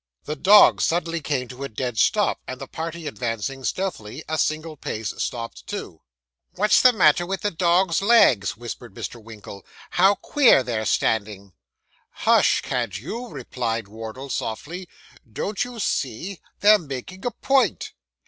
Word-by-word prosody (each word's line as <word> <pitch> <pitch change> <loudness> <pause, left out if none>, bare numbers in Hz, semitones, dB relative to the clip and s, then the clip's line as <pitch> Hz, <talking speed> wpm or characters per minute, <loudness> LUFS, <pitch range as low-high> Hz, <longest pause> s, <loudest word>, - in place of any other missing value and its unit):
The 150 - -4
dogs 200 +8 +6
suddenly 170 0 0
came 140 -3 -2
to 130 +2 -8
a 140 - -4
dead 120 0 -3
stop, - - +2
and - - -6
the - - -6
party 165 0 -6
advancing 130 -1 -4
stealthily 150 - -4
a 160 0 -2
single 155 +1 -1
pace, 110 -6 -4
stopped 115 -1 -5
too. - - -7 0.5
'What's 210 +3 +4
the 255 - +7
matter 175 - +4
with 190 +2 -4
the 205 - -1
dogs' 175 +1 +2
legs?' 200 - +4
whispered 120 -2 -8
Mr. 120 -2 -7
Winkle. 105 -3 -11 0.3
'How 190 +3 +4
queer 250 - +4
they're 115 -3 -2
standing.' 100 -1 -1 0.7
'Hush, - - +4
can't 120 -7 -2
you?' 230 - -6
replied 120 - -4
Wardle 115 +6 -8
softly. 170 +11 -4 0.4
'Don't 200 - -2
you 245 -1 -8
see, 165 - -2 0.2
they're 210 +1 +7
making 155 +5 -8
a 245 - 0
point? 270 +2 0
145 Hz, 150 wpm, -23 LUFS, 115-185 Hz, 0.7 s, the